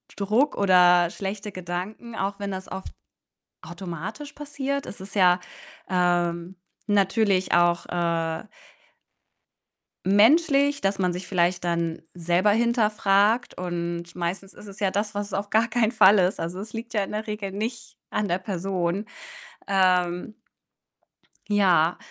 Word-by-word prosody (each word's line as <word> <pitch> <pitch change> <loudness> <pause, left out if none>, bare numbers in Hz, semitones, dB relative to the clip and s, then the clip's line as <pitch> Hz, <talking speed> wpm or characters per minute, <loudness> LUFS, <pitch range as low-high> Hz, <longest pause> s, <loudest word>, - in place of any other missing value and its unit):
Druck 220 +9 +1
oder 180 -3 +5
schlechte 200 +2 -5
Gedanken, 185 +6 -6
auch 200 0 -3
wenn 200 0 -4
das 190 0 -7
oft 190 0 -7 0.7
automatisch 185 - -7
passiert. 280 -1 -4
Es 190 - -9
ist 195 +2 -9
ja, 180 -2 +5 0.5
ähm, 175 -1 0 0.3
natürlich 200 -1 +2
auch, 175 0 +3
äh 165 -2 -1 1.6
menschlich, 280 - +4
dass 195 0 0
man 180 -1 +1
sich 180 +2 -6
vielleicht 175 -1 +1
dann 170 -1 -1
selber 175 +3 +1
hinterfragt 215 -1 +2
und 170 -1 -4
meistens 180 +3 -4
ist 210 - -12
es 200 +1 -10
ja 195 - +2
das, 205 +1 -2
was 205 0 -2
es - - -11
auf 200 +1 -2
gar 225 +2 +2
keinen 230 0 +1
Fall 205 -1 +6
ist. 185 +1 +1
Also, 175 +3 -4
es 215 +2 -8
liegt 230 +1 -7
ja 205 -2 +1
in - - -10
der 215 +1 -3
Regel 210 -2 -4
nicht 230 +4 -5
an 210 - -1
der 175 +1 0
Person. 185 0 -2 0.6
Ähm 185 0 +1 1.2
Ja. 180 -5 +3
195 Hz, 140 wpm, -25 LUFS, 175-215 Hz, 1.6 s, Fall